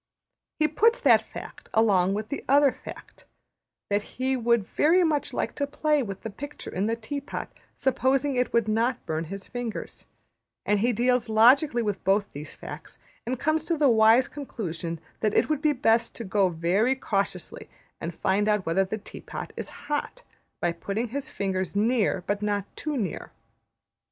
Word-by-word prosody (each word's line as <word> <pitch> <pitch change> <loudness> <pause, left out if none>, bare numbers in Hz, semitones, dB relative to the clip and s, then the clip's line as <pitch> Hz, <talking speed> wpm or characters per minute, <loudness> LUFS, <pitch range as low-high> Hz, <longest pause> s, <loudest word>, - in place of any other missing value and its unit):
He 310 - +3
puts 450 +11 +3
that 235 -6 +6
fact - - -10
along 195 -4 +4
with 215 +1 -4
the 285 - -4
other 280 0 +6
fact: - - -12 0.7
that 205 +1 +2 0.2
he 260 +1 +1
would 235 -4 +2
very 335 - +3
much 305 -3 0
like - - -2
to 285 - 0
play 300 +1 +1
with 195 -5 -5
the 225 - -5
picture 285 +8 -8
in 195 +3 0
the 230 - +1
tea 230 +5 -5
pot 280 - -6 0.2
supposing 265 +1 +1
it 250 -1 +1
would 230 -2 +2
not 230 +4 0
burn 160 +1 -2
his 195 +3 -7
fingers; 245 -3 -6 0.6
and 210 0 +2
he 240 +4 +2
deals 245 +1 +1
logically 240 +3 +5
with 205 -3 -2
both 195 +2 +1
these 150 +2 -8
facts; - - -9 0.3
and 250 0 -2
comes 310 +1 +1
to 335 - 0
the 290 -2 +4
wise 225 +2 +5
conclusion 170 - -5 0.2
that 215 -1 0
it - - +3
would 305 -2 0
be 305 - +3
best 230 -4 +2
to 235 - -6
go 195 -2 +2
very 180 +10 +1
cautiously 195 -7 -3 0.3
and 165 0 -5
find 200 +2 +1
out 210 -3 +1
whether 170 +4 +2
the 190 +3 -4
tea 205 - -11
pot - - -7
is - - -5 0.2
hot, 295 +12 -3 0.4
by 175 - +1
putting 200 +7 -3
his 280 +4 -5
fingers 190 -1 -2
near, 210 -3 +2
but 205 0 -1
not 205 -2 0
too 305 -2 -3
near. 200 -8 -3
225 Hz, 180 wpm, -26 LUFS, 200-270 Hz, 0.7 s, that